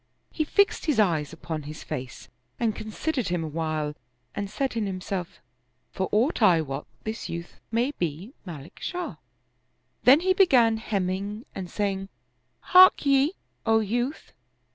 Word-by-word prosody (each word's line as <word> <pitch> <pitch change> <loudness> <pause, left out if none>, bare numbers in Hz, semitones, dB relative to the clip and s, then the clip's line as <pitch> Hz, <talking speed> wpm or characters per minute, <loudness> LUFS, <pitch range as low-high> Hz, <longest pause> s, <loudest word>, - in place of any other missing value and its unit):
He 310 - 0
fixed 400 +2 +2
his 295 -7 +2
eyes 165 -8 +2
upon 160 -1 -5
his 150 +1 -8
face 125 -1 -6 0.3
and 225 -3 +1
con 215 - -7
sidered 255 +1 -2
him 175 -2 -1
a - - -3
while 155 -1 -2 0.4
and 200 -1 -4
said 265 +4 -2
in 220 -3 0
himself, 185 -1 -4 0.3
" 125 0 -46
For 190 -1 -2
aught 240 +7 +2
I 180 -6 +6
wot, 135 -3 -5 0.2
this 220 0 -5
youth 170 +1 -7
may 240 +4 +1
be 175 - -3
Malik 160 -5 -10
Shah 360 -1 -4 0.4
"; - - -46
then 270 +5 +8
he 375 +1 +3
began 250 - +5
hemming 200 0 -2
and 185 -2 -6
saying, 195 -1 -2 0.3
" - - -46
Hark 370 -4 +8
ye, 275 +4 +4 0.3
O 225 -1 +4
youth 240 +7 -2
205 Hz, 165 wpm, -26 LUFS, 170-245 Hz, 0.4 s, then